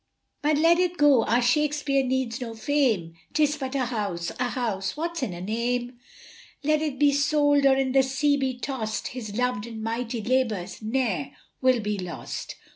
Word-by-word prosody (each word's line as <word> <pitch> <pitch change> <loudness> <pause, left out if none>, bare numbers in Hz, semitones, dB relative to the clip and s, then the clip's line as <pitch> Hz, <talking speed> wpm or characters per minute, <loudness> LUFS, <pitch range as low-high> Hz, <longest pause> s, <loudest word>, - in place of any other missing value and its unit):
But 295 0 +2
let 335 +3 +5
it 360 -1 +1
go, 285 -5 +5
our 240 +2 +2
Shakespeare 290 +1 +2
needs 260 -1 -1
no 230 -2 -5
fame, 225 - +1 0.2
'Tis 295 -1 +2
but 265 -1 -4
a 260 -2 +1
house! 200 -8 -3
a 250 0 0
house! 215 -4 -2
"What's 335 +1 -3
in 255 - -1
a 175 0 -7
name?" 240 +4 -2 0.6
Let 305 +1 +2
it 300 -4 -2
be 290 0 +4
sold, 290 0 +3
or 265 - +5
in 265 -1 0
the 270 +1 +5
sea 270 +2 +1
be 265 -2 -1
tossed 245 -5 -3
His 220 -5 -7
loved 245 -3 0
and 225 -2 -7
mighty 230 +1 -2
labours 230 -7 -1
ne'er 220 - -1 0.3
will 255 -2 +3
be 210 -1 -2
lost. 180 -2 -6
255 Hz, 180 wpm, -26 LUFS, 225-285 Hz, 0.6 s, let